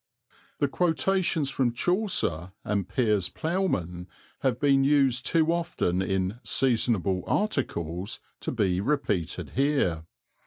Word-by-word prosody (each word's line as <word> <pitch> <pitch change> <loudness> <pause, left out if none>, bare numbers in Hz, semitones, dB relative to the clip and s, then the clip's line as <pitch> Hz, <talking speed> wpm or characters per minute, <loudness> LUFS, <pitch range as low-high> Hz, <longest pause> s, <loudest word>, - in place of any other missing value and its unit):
The 145 - +1
quotations 170 -1 +1
from 125 -3 +1
Chaucer 120 - 0
and 100 -2 -1
Piers 105 -7 +1
Plowman 95 - -2 0.3
have 130 -4 0
been 135 -2 +4
used 135 -4 +2
too 165 0 +3
often 165 - -1
in 95 +3 -1
"seasonable 110 -8 +1
articles" 95 - -1 0.2
to - - -3
be 95 -6 +1
repeated 105 - -1
here. 120 - +1
120 Hz, 110 wpm, -27 LUFS, 95-150 Hz, 0.3 s, been